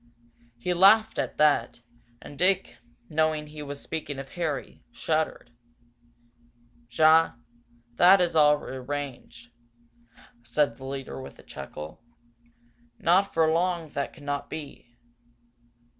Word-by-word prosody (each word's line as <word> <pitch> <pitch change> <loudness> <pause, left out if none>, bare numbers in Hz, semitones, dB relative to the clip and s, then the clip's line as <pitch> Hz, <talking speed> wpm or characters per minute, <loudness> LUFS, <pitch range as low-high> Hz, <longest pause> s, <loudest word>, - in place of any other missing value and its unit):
He 180 +10 -1
laughed 215 +5 +5
at - - -3
that, 145 -6 +2 0.4
and 145 - -10
Dick, 185 +5 0 0.3
knowing 155 0 0
he 150 0 -10
was 145 -1 -7
speaking 150 -3 -5
of 135 0 -7
Harry, 160 -4 -4
shuddered. 155 -6 -2 1.4
"Ja, 160 +5 +5 0.6
that 185 +2 +7
is 175 -2 0
all 150 -1 +6
arranged," 130 -3 -7 0.9
said 120 +1 0
the 135 - -10
leader, 135 0 -6
with 130 - -11
a - - -16
chuckle. 75 +6 -9 1.0
"Not 190 +4 +3
for 160 -1 +2
long 170 -1 0
that 140 -1 -3
could 150 - -16
not 145 0 -3
be. 140 -5 -9
150 Hz, 115 wpm, -26 LUFS, 135-165 Hz, 1.4 s, that